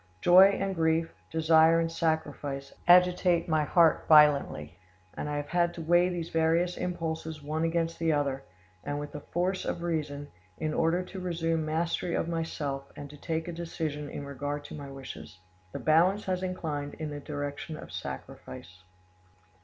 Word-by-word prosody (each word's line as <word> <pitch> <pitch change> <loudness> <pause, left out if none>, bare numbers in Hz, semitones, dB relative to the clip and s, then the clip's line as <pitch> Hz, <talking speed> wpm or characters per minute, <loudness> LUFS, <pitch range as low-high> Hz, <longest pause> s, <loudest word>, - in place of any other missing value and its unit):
Joy 180 +2 +8
and 195 0 -1
grief, 165 -1 +1 0.2
desire 160 0 +4
and 165 0 -1
sacrifice, 145 -4 -2
agitate 180 -1 +5
my 155 -2 +2
heart 165 0 +4
violently, 140 - +4 0.3
and 150 - -5
I 145 - -2
have 145 0 -4
had 175 0 +1
to 170 - -6
weigh 175 +2 +4
these 175 -2 -4
various 165 +2 +2
impulses 160 -3 -4
one 155 +2 -2
against 165 0 -1
the 165 -1 +2
other, 140 -3 0 0.4
and 145 0 -3
with 145 0 -6
the 150 - -6
force 180 +5 -2
of 170 - -3
reason, 150 -4 -3 0.3
in 155 -1 -2
order 165 +3 +1
to 190 +1 -8
resume 165 -3 -1
mastery 165 +2 -1
of - - -1
myself 150 -5 -3
and 145 -1 -9
to - - -11
take 160 +2 -3
a 175 - -4
decision 160 -3 -4
in 145 - -6
regard 145 +1 -4
to - - -9
my 140 -2 -8
wishes. 135 -8 -9 0.3
"The - - -5
balance 175 +6 +3
has 185 -1 -1
inclined 155 -6 -4
in 155 -2 -5
the 145 - -5
direction 145 +1 -5
of - - -10
sacrifice. 90 +1 -8
160 Hz, 170 wpm, -29 LUFS, 145-170 Hz, 0.4 s, Joy